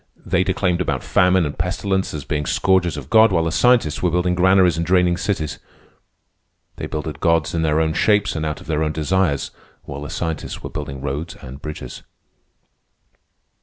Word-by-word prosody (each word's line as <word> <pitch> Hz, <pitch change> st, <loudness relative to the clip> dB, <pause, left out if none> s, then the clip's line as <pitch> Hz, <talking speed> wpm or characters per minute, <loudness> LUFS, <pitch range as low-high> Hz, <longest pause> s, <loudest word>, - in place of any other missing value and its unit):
They 95 Hz, 0 st, +2 dB
declaimed 90 Hz, -2 st, 0 dB
about 90 Hz, -, -2 dB
famine 90 Hz, -1 st, +3 dB
and 75 Hz, -, -4 dB
pestilence 95 Hz, +3 st, -1 dB
as 75 Hz, -, -6 dB
being 75 Hz, -1 st, -2 dB
scourges 90 Hz, -4 st, +2 dB
of 70 Hz, -1 st, -9 dB
God, 110 Hz, -1 st, +6 dB
while 85 Hz, -3 st, +2 dB
the 80 Hz, -, -1 dB
scientists 120 Hz, -, +3 dB
were 90 Hz, -, +2 dB
building 90 Hz, +1 st, +1 dB
granaries 95 Hz, 0 st, +4 dB
and 85 Hz, -, -1 dB
draining 90 Hz, 0 st, +3 dB
cities. 90 Hz, -4 st, -3 dB, 1.2 s
They -, -, -5 dB
builded 75 Hz, -1 st, -5 dB
gods 80 Hz, -1 st, +1 dB
in 85 Hz, -, 0 dB
their 80 Hz, -1 st, +2 dB
own 80 Hz, 0 st, +1 dB
shapes 105 Hz, +2 st, +2 dB
and 80 Hz, -, -2 dB
out 75 Hz, -1 st, -3 dB
of -, -, -13 dB
their 75 Hz, +1 st, 0 dB
own 75 Hz, 0 st, -1 dB
desires, 80 Hz, -1 st, 0 dB, 0.3 s
while 70 Hz, -, -7 dB
the 75 Hz, -, -6 dB
scientists 80 Hz, -2 st, -4 dB
were -, -, -6 dB
building 70 Hz, -1 st, -6 dB
roads 70 Hz, +5 st, -4 dB
and 65 Hz, +2 st, -11 dB
bridges. 75 Hz, -5 st, -7 dB
85 Hz, 180 wpm, -21 LUFS, 75-90 Hz, 1.2 s, God